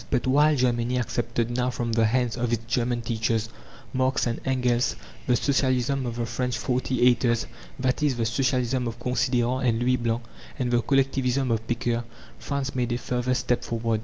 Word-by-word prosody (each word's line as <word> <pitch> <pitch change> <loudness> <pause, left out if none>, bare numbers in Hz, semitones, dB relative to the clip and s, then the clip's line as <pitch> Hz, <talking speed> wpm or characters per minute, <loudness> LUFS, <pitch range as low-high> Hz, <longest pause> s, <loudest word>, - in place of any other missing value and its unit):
But 125 - 0
while 145 +4 +4
Germany 125 -1 +1
accepted 120 0 -1
now 125 0 +1
from 120 -2 -3
the 115 -1 +3
hands 125 0 +1
of 120 -1 -1
its 115 -1 -1
German 120 0 0
teachers, 110 -1 -1 0.4
Marx 130 0 +1
and 120 -1 -2
Engels, 125 -2 +1 0.3
the 125 - +4
Socialism 130 -1 +1
of 115 - -4
the 120 -1 -2
French 125 0 -2
"forty 125 +2 0
eighters" 120 -1 +3 0.3
that 130 +1 0
is, 145 -4 +2
the 115 - 0
Socialism 125 +1 0
of 115 0 -5
Considérant 125 +1 0
and 115 - +1
Louis 125 +1 +2
Blanc, 120 0 -1 0.3
and 125 -3 -1
the 120 -1 +3
Collectivism 135 -1 +1
of 115 -1 -1
Pecqueur, 120 0 -1 0.4
France 140 -1 -3
made 125 -2 -1
a - - 0
further 125 0 -1
step 125 -1 0
forward. 115 -2 -1
125 Hz, 180 wpm, -26 LUFS, 120-130 Hz, 0.4 s, while